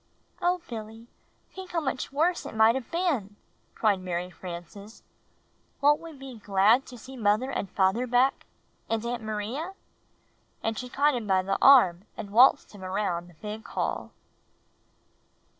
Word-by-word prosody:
"Oh, 355 0 +1
Billy, 225 0 -8 0.5
think 375 -1 -9
how 335 - +2
much 265 -3 -3
worse 330 +5 0
it - - -9
might 220 +1 +6
have 260 -2 -5
been," 290 - -1 0.4
cried 210 -4 +2
Mary 180 0 -4
Frances. 180 +5 -10 0.8
"Won't 295 +1 +4
we 330 0 -9
be 270 -5 -10
glad 205 +6 +3
to 250 - -10
see 260 +4 -11
father 215 +6 +2
and 200 - -3
mother 200 +6 +2
back 250 +2 +2 0.2
— - - -40
and 225 0 -1
Aunt 240 0 -3
Maria?" 220 - -4 0.9
and 225 0 -1
she 250 +3 -6
caught 290 +3 +2
him 235 -4 -3
by 190 -1 +3
the 195 +1 -1
arm 200 -9 +6
and 200 - -7
waltzed 255 +6 +5
him 200 -2 -11
around 185 -2 -2
the 175 - -18
big 210 +5 -7
hall. - - -3
225 Hz, 160 wpm, -27 LUFS, 200-270 Hz, 0.9 s, might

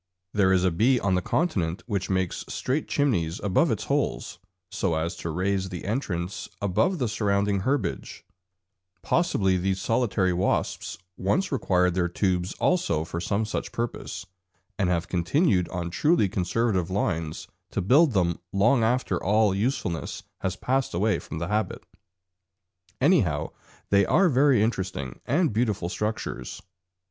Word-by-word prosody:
There 95 -2 +3
is 95 -1 +3
a 95 - +3
bee 120 +9 +3
on 100 -2 +1
the 90 - +2
continent 90 - -1
which 100 -5 -2
makes 95 -2 -1
straight 140 +4 -2
chimneys 90 - 0
above 100 -3 +2
its - - -1
holes, - - -2 0.3
so 90 -4 0
as 80 +2 -2
to 85 - -5
raise 95 +3 -1
the 90 -2 -6
entrance 100 -5 -3
above 100 - +1
the 125 -6 0
surrounding 100 -2 +1
herbage; 135 +9 -2 0.8
possibly 100 - +2
these 95 +1 -1
solitary 105 -4 +1
wasps 90 +2 -1 0.2
once 185 - 0
required 90 -8 +2
their 90 -1 +1
tubes 90 0 -1
also 130 - +1
for 85 +1 -5
some 100 +4 0
such 110 - -4
purpose, 120 -4 -4 0.5
and 95 -3 +2
have 85 -2 0
continued 90 - +1
on 85 -2 -4
truly 150 - +3
conservative 95 0 0
lines 85 -5 -2 0.2
to - - -3
build 135 - +4
them 85 -4 +1
long 115 +6 +3
after 125 +3 0
all 105 0 +3
usefulness 100 -5 -2 0.2
has 95 -1 -2
passed 130 0 -1
away 105 +5 +1
from - - -7
the 85 +1 -3
habit; 105 -1 -2 1.1
anyhow 100 - +2 0.4
they 100 0 +5
are 185 +2 +4
very 135 -5 +4
interesting 95 - -3
and 150 - +2
beautiful 105 -6 0
structures. 105 - -4
100 Hz, 145 wpm, -26 LUFS, 90-120 Hz, 1.1 s, they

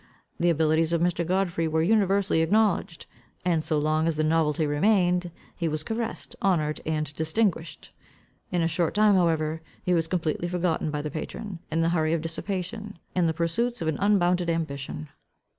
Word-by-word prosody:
The 175 - +3
abilities 160 0 +2
of 170 - +2
Mr. 175 -1 +1
Godfrey 175 -2 0
were 160 0 +1
universally 195 -3 +3
acknowledged. 190 -1 +1 0.4
And 165 -3 +2
so 155 - 0
long 155 +2 +1
as 165 - +1
the 155 - 0
novelty 155 0 +2
remained, 180 +3 +2 0.3
he 170 - -2
was 155 -1 -2
caressed, 225 +3 -4
honoured, 155 -6 +1
and 155 -2 -1
distinguished. 165 +1 -1 0.6
In 175 -2 +1
a - - +2
short 170 +1 -1
time 210 0 +5
however, 160 -3 +1 0.2
he 180 - +1
was 165 -2 +1
completely 170 -1 -1
forgotten 175 -3 0
by 150 -1 -3
the 150 - -4
patron, 185 +5 -6
in 160 +1 +1
the 165 - +2
hurry 160 -2 +1
of 165 - 0
dissipation, 195 +5 -4 0.2
and 175 -2 +2
the - - 0
pursuits 225 +9 0
of 165 - -3
an 160 - -1
unbounded 180 -4 +2
ambition. 155 -2 -3
165 Hz, 175 wpm, -26 LUFS, 155-185 Hz, 0.6 s, time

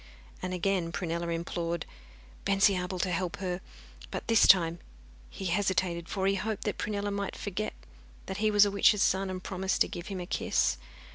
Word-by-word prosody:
And 185 - -3
again 180 -1 0
Prunella 170 0 -2
implored 170 0 -2 0.6
Bensiabel 195 -2 +2
to 185 - 0
help 175 0 -1
her. 185 -1 -3 0.5
But - - -5
this 225 -2 +5
time 170 -2 +5 0.5
he 195 - -7
hesitated, 180 -1 0
for 190 -1 -1
he 195 - +3
hoped 210 +2 -2
that 210 - -2
Prunella 205 -1 -2
might 200 -1 -3
forget 205 +1 -3 0.5
that 190 - -5
he 215 +1 +2
was 205 -1 +6
a 205 - 0
witch's 200 +1 +4
son, 190 0 +1
and 185 -1 -5
promise 190 0 -1
to - - +4
give 175 0 -7
him 195 -2 -4
a 180 - -4
kiss. 65 - +1
190 Hz, 180 wpm, -30 LUFS, 175-200 Hz, 0.6 s, was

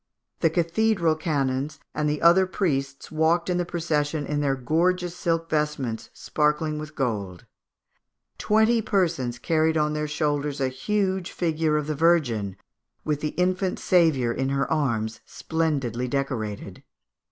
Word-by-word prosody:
The 165 - +3
cathedral 170 +1 +2
canons 145 -2 -1
and 150 0 0
the 150 +1 -2
other 180 +3 +6
priests 135 -8 -2
walked 165 +3 +2
in 180 - 0
the 175 - 0
procession 155 -3 -1
in 145 0 -1
their 140 -2 +1
gorgeous 175 +7 0
silk 165 -1 -1
vestments 150 -7 -1
sparkling 150 0 0
with 155 0 -8
gold. 100 - -3 0.9
Twenty 220 +2 +3
persons 170 - 0
carried 160 +5 +1
on 150 0 +1
their 150 0 -2
shoulders 150 -1 -1
a 135 -1 +1
huge 190 +6 -1
figure 160 -2 0
of 150 - -1
the 155 - -2
Virgin, 135 - +1 0.5
with 150 -1 -1
the 150 - -3
infant 185 +1 +1
Saviour 160 -9 +3
in 135 +2 -1
her 140 0 0
arms, 115 -8 0
splendidly 140 -7 -2
decorated. 120 -6 -3
150 Hz, 140 wpm, -25 LUFS, 135-170 Hz, 0.9 s, other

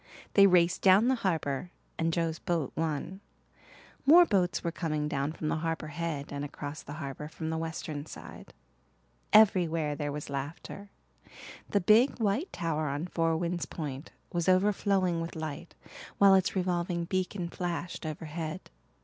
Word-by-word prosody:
They 200 -1 +7
raced 175 -2 +3
down 195 +5 +6
the - - +4
harbour 160 -4 -1 0.3
and 165 0 +1
Joe's 165 -1 -1
boat 170 -7 -2
won. 165 +4 -3 0.9
More 345 +4 +9
boats 180 - +1
were 170 - -1
coming 155 -3 -2
down 140 -1 -1
from 155 -1 -5
the 160 - 0
Harbour 160 -1 -3
Head 150 -3 -4
and 140 0 -3
across 145 +1 -6
the 145 - -9
harbour 150 -1 -6
from 160 +1 -5
the 160 - -1
western 160 -2 -5
side. - - -11 0.8
Everywhere 170 -8 +4
there 145 -1 -3
was 150 0 -5
laughter. 145 +8 -6 0.8
The 200 - +2
big 225 +8 +4
white 225 - 0
tower 155 -2 -2
on 145 +4 -2
Four 165 -2 0
Winds 175 0 -2
Point 145 -2 -6 0.2
was 175 +1 +1
overflowing 185 -2 +2
with 165 +1 -5
light, 155 +1 -6 0.4
while 200 -1 +7
its 190 0 +3
revolving 175 -2 -1
beacon 185 0 -2
flashed 175 0 -4
overhead. 155 +2 -5
165 Hz, 150 wpm, -30 LUFS, 155-185 Hz, 0.9 s, More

